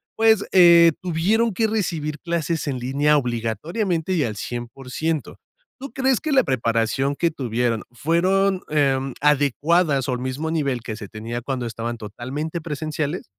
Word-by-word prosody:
pues, 220 -2 +4
eh, 170 -3 +7
tuvieron 195 +7 +1
que 220 +3 +1
recibir 165 -8 -2
clases 170 0 -2
en 130 -3 -2
línea 145 +4 +2
obligatoriamente 150 - -2
y 165 -5 +2
al 110 -4 -3
100%? 125 +7 -4 0.4
¿Tú 275 +1 -7
crees 265 -3 +2
que 310 -1 -2
la 265 -3 +5
preparación 115 +2 0
que 170 +2 +1
tuvieron 120 -4 -1
fueron, 185 +8 +1
em, 135 -3 +1
adecuadas 145 0 +2
o - - +1
al 125 - -2
mismo 130 +5 -3
nivel 140 -7 -1
que 110 - -5
se 105 -2 -8
tenía 115 +3 -5
cuando 125 0 -3
estaban 115 +1 -4
totalmente 130 - -5
presenciales? 155 +1 -3
150 Hz, 150 wpm, -22 LUFS, 125-170 Hz, 0.4 s, eh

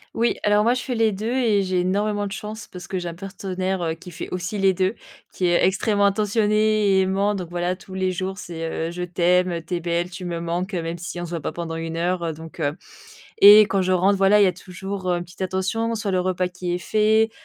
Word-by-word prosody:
Oui, 235 +1 +2
alors 210 0 +4
moi 235 - +4
je 250 - -2
fais 255 - -3
les 225 -2 +2
2 215 +4 -3
et 230 -6 +2
j'ai 185 -1 0
énormément 205 +3 0
de 195 - -6
chance, 215 0 -7
parce 180 -1 -10
que 190 - -2
j'ai 175 - -5
un 170 - -4
partenaire, 190 0 -4
heu, 165 -1 -1
qui 175 +2 -11
fait 165 - -6
aussi 185 +3 -3
les 195 -1 +3
2, 185 +2 0 0.4
qui 185 - -2
est 175 0 +3
extrêmement 200 +2 +2
attentionné 210 0 +2
et 190 - +5
aimant. 195 +2 +1
Donc 180 -4 -5
voilà 175 +1 -2
tous 190 - -13
les 190 0 0
jours, 190 +1 -4
c'est, 165 -2 -4
heu: - - -6
«Je 180 +1 -4
t'aime, 180 0 +1
tu 180 - -3
es - - -1
belle, 170 +1 -1
tu 180 +1 -8
me 170 -1 -3
manques», 175 +4 -3
heu, 175 - -1
même 165 +1 -4
si 175 +1 -6
on - - -3
se - - -9
voit 170 -1 -3
pas 155 - -4
pendant 170 -1 -5
1 165 0 -4
heure 170 -1 -1
donc 160 +2 -11
heu 145 -1 0 0.6
et 205 +2 +10
quand 195 -2 0
je 185 - 0
rentre, 190 +2 +3
voilà, 195 +2 +5
il 205 - +6
y - - +5
a 180 - +1
toujours, 185 +1 -5
heu, 175 - +1
une 175 - -5
petite 175 +2 -14
attention 190 +5 -1
sur 210 -2 -2
le 185 -1 +1
repas 185 0 0
qui 180 -1 -4
est - - 0
fait, 215 +4 +2
185 Hz, 260 wpm, -23 LUFS, 175-205 Hz, 0.6 s, et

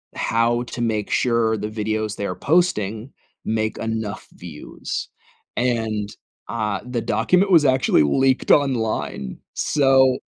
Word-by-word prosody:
how 115 +1 +1
to 120 0 -7
make 110 -3 -1
sure 115 -2 +1
the 105 +1 -3
videos 110 0 -2
they're 100 -3 -3
posting 130 - 0 0.3
make 110 0 -1
enough 110 -2 -4
views, 80 -4 -7 0.5
and, 110 -4 -1 0.3
uh, 105 -3 -2
the 125 -2 -3
document 180 - +2
was 160 -4 +6
actually 130 - +3
leaked 130 - +2
online, 110 - 0 0.2
so 135 -3 +3
115 Hz, 115 wpm, -22 LUFS, 110-130 Hz, 0.5 s, was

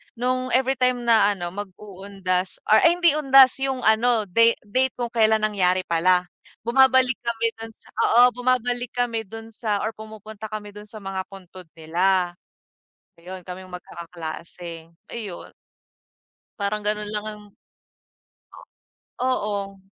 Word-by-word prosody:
nung 255 +2 -1
everytime 255 -1 +1
na 220 -3 +4
ano 175 -2 -5
mag 205 +2 -5
uundas 190 -2 -3 0.2
or 215 - +8
ay 335 +1 +5
hindi 345 -2 +4
undas 270 -3 +6
yung 265 -2 -2
ano 220 +1 +3
date 230 +5 +4
date 255 +5 0
kung 240 -1 -4
kelan 220 -2 +3
nangyari 185 -3 +1
pala. 180 +2 +3 0.4
Bumabalik 260 +2 +4
kami 230 -1 0
dun 225 0 -7
sa - - -23 0.3
oo 240 - +8
bumabalik 245 -1 0
kami 240 -2 -1
dun 225 +2 -9
sa 220 0 -6
or 220 - -1
pumupunta 220 0 -9
kami 210 -1 -6
dun 210 0 -11
sa 215 +1 -10
mga 195 0 -4
puntod 185 -2 -12
nila. 175 +3 +1 0.9
Ayun 185 +1 -8
kaming 185 0 -9
magkakaklase. 170 -1 -9 0.2
Ayun. 210 -7 -7 1.1
Parang 210 0 -2
ganun 210 0 -2
lang 210 0 -3
ang 210 -1 -10 1.7
Oo, 205 -6 -2
215 Hz, 130 wpm, -23 LUFS, 185-245 Hz, 1.7 s, or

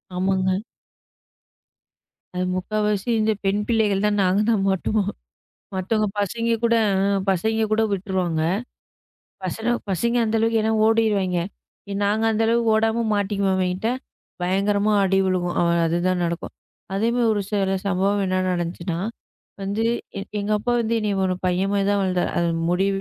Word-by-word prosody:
ஆமாங்க. 190 +1 0 1.9
முக்காவாசி 210 +3 -1
இந்த 220 0 +2
பெண் 200 +2 +1
பிள்ளைகள் 210 -3 +2
தான் 205 0 +1
நாங்க 185 +2 +2
தான் 210 -4 +1
மாட்டுவோம். 200 +2 0 0.6
மத்த 190 +4 0 0.2
பசங்க 230 +4 0
கூடப் 200 -4 +2
பசங்க 220 +4 +1
கூட 220 +1 +3
விட்டுருவாங்க 185 -4 -1 1.0
பசங்க. 225 +6 -2 0.2
பசங்க 235 +6 0
அந்த 225 0 0
அளவுக்கு 225 0 +2
ஏன்னா 220 0 +1
ஓடிருவாங்க. 210 -5 +2 0.7
நாங்க 215 +2 +1
அந்த 220 +1 +1
அளவு 235 +1 +2
ஓடாம 225 +1 +2
மாட்டிக்குவோம் 200 -1 0
அவங்கிட்ட. 185 +3 -1 0.5
பயங்கரமா 200 +3 +1
அடி 195 0 +2
விழும். 185 -1 0 0.4
அது 165 +1 +1
தான் 185 -1 +1
நடக்கும். 170 0 -3 0.4
அதே 210 +4 +1 0.2
ஒரு 210 - +1 0.5
சம்பவம் 195 +2 +1
என்ன 185 0 0
நடந்துச்சுன்னா, 170 -1 -2 0.6
வந்து 205 +3 -1 0.6
எங்க 205 +1 -3
அப்பா 240 +4 -1
வந்து 230 0 0
என்னைய 210 -2 0
ஒரு 185 -1 +1
பையன் 185 +2 +1 0.2
தான் 205 0 +2
வளர்ந்தார். 185 -2 0
அது 170 0 +1 0.2
முடி 180 +2 +2
200 Hz, 130 wpm, -23 LUFS, 185-220 Hz, 1.9 s, கூட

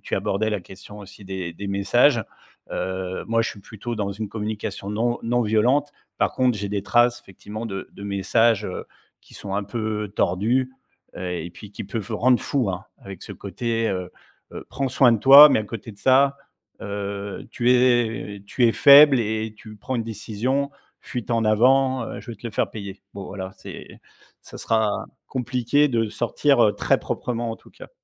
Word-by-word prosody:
tu - - -3
abordais 110 +3 -1
la 105 -3 -2
question 95 +3 -13
aussi 100 0 -13
des 95 -3 -5
des 100 +4 -7
messages, 115 +4 +3 0.5
heu, 95 0 -4
moi, 115 0 +2
je - - -2
suis 100 - -11
plutôt 110 +4 -7
dans 100 -2 -2
une 105 +1 -5
communication 105 -2 -5
non 120 +3 0
non 120 +1 +1
violente. 125 +7 +2 0.3
Par - - +1
contre, 125 -4 +1
j'ai 100 0 -4
des 100 -1 -2
traces 120 +3 +2
effectivement 105 +4 -9
de 95 -3 -6
de - - -12
messages, 105 +2 +2
heu, 90 - -6 0.4
qui - - -19
sont 95 -1 -6
un 100 - 0
peu 105 -1 -4
tordus, 120 +8 +1 0.4
heu, 90 0 -4
et 85 0 -5
puis 105 +3 -12
qui 100 - -7
peuvent 110 +1 -5
rendre 120 +3 +3
fou, 130 -8 -1
hein. 95 +3 -5 0.2
Avec 95 -2 -10
ce - - -8
côté, 115 -1 -2
heu 90 -2 -3 0.4
heu: - - -8
«Prends 135 -1 -2
soin 125 -1 +4
de 115 - +1
toi» 140 +6 +10
mais - - +3
à - - -5
côté 110 +1 -8
de 100 - -19
ça, 135 +1 +4 0.5
heu: 100 0 -5
«Tu 120 0 +1
es 120 -5 +1
tu 125 - +2
es 115 - +3
faible 140 -2 +8
et 110 0 -3
tu 110 0 -12
prends 130 +5 -5
une 115 - -2
décision, 115 +6 -2 0.3
fuite 125 -2 -6
en 115 -1 +1
avant, 130 +4 +3
heu, - - -7
je 125 - -10
vais 115 - -11
te 120 - -8
le - - -5
faire - - 0
payer». 100 -2 -8
Bon 100 -1 -7
voilà, 95 -1 -7
c'est - - -11 0.4
ça - - -12
sera 110 -2 0 0.2
compliqué 125 +3 +1
de 115 -4 0
sortir, 120 +3 +1
heu, 105 -1 +2
très - - +1
proprement, 120 -1 -3
en 115 - -5
tout - - -20
cas. - - -13
110 Hz, 195 wpm, -23 LUFS, 100-120 Hz, 0.5 s, toi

